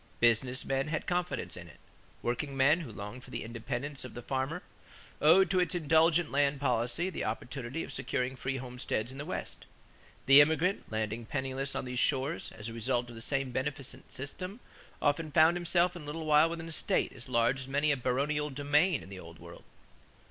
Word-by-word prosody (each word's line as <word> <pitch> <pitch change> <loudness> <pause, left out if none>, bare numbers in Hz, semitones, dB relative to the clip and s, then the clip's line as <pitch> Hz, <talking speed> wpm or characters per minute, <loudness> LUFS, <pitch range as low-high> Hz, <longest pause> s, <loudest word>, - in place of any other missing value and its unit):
Business 120 +2 +3
men 135 +1 0
had 155 0 -2
confidence 180 0 -2
in - - -9
it. - - -15 0.5
Workingmen, 135 +5 +2
who 135 -8 -7
longed 105 +5 -8
for - - -13
the - - -4
independence 120 +5 -4
of 125 - -9
the 120 - -7
farmer, 135 +8 -2 0.6
owed 180 +6 +6
to 185 - +3
its 180 +1 +1
indulgent 165 0 +3
land 140 0 +2
policy 125 +7 0
the - - -3
opportunity 125 +6 -4
of - - -8
securing 125 +1 -2
free 135 +1 -3
homesteads 125 -2 -3
in 135 - -9
the 145 - -4
West. - - -5 0.6
The 135 +2 +9
immigrant, 160 - +1
landing 110 +1 -2
penniless 135 0 -3
on 135 - -2
these 125 0 -3
shores, 140 +5 0
as 105 0 -6
a 115 - -6
result 120 +1 -1
of - - -11
the 115 - -8
same 135 +2 -1
beneficent 135 +1 -4
system, 185 - -6 0.4
often 150 +2 +1
found 160 +3 +6
himself 175 0 +2
in 175 - -7
a - - -10
little 155 +2 -5
while 155 +1 +5
with 170 0 -4
an 165 - -8
estate 165 - 0
as 130 +1 -9
large 120 +2 +2
as 130 - -7
many 145 +2 +2
a - - +3
baronial 140 +4 0
domain 145 +4 +2
in - - -12
the 95 -1 -8
Old 85 -1 -11
World. 85 0 -12
135 Hz, 195 wpm, -31 LUFS, 125-155 Hz, 0.6 s, The